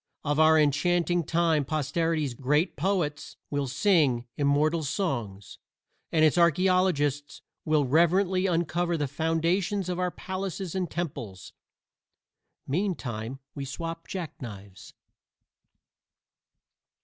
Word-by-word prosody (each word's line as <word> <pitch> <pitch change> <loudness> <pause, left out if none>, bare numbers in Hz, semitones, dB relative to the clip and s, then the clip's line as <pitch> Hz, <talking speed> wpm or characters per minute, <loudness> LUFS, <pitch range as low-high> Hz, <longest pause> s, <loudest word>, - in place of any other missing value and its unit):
Of 145 0 0
our 160 0 +6
enchanting 170 +4 +2
time 165 -2 +2
Posterity's 155 0 -1
great 150 +8 0
poets 175 -6 -2
will 145 -1 -1
sing 140 - +2
immortal 150 +3 +2
songs, 135 - -3 0.5
and 160 -1 +4
its 155 +3 +3
archaeologists 170 -4 +2 0.2
will 155 -2 +2
reverently 180 +6 +3
uncover 175 0 0
the 145 -2 -1
foundations 165 +6 0
of 180 0 -2
our 180 0 +1
palaces 190 -1 -5
and 185 -3 -2
temples. 120 - -6 1.1
Meantime 135 - -3 0.2
we 140 - -5
swap 165 +4 -6
jack 180 -5 -6
knives. 100 -6 -10
160 Hz, 100 wpm, -27 LUFS, 140-175 Hz, 1.1 s, our